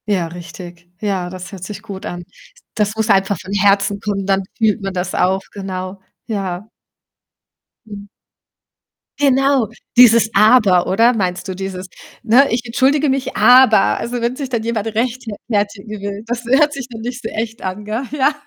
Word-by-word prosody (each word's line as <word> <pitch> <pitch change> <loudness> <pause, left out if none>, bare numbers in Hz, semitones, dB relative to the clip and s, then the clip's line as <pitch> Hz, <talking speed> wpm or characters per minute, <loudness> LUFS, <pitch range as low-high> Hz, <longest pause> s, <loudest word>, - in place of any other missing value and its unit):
Ja, 190 -5 0
richtig. 175 0 -11
Ja, 190 -4 -2
das 185 0 -9
hört 190 -3 -9
sich 200 0 -7
gut 195 -3 -8
an. 175 0 -6 0.5
Das 210 0 0
muss 220 0 -1
einfach 195 -1 +2
von 190 +3 -8
Herzen 200 0 +2
kommen, 200 -2 -3
dann 195 0 +1
fühlt 220 -1 +1
man 195 -1 -4
das 180 0 -3
auch. 190 +1 +1
Genau, 190 -1 -6 0.2
ja. 195 -3 -4 1.2
Mhm. 205 -2 -10 1.1
Genau, 270 -3 +3 0.3
dieses 230 -2 +7
„aber“, 210 -4 +5
oder? 230 +6 +4
Meinst 185 -5 -2
du 185 - -4
dieses, 190 -1 -6 0.4
ne: 245 +5 +5
„Ich 235 +1 0
entschuldige 270 +5 +2
mich, 265 0 -2
aber“ 245 +1 +6 0.2
Also, 240 0 -4
wenn 235 +2 -1
sich 275 -1 -5
dann 235 -3 -2
jemand 225 -2 -2
rechtfe 230 +2 -2 0.2
fertigen 205 0 -2
will, 200 +1 -5
das 240 +1 -4
we 255 +3 +3
hört 295 0 +3
sich 275 -3 -6
dann 225 -2 -9
nicht 245 +2 -5
so 225 - -4
echt 225 +1 -5
an, 190 +2 -5
gell? 220 +5 -3
Ja. 295 0 +2
210 Hz, 170 wpm, -18 LUFS, 195-240 Hz, 1.2 s, dieses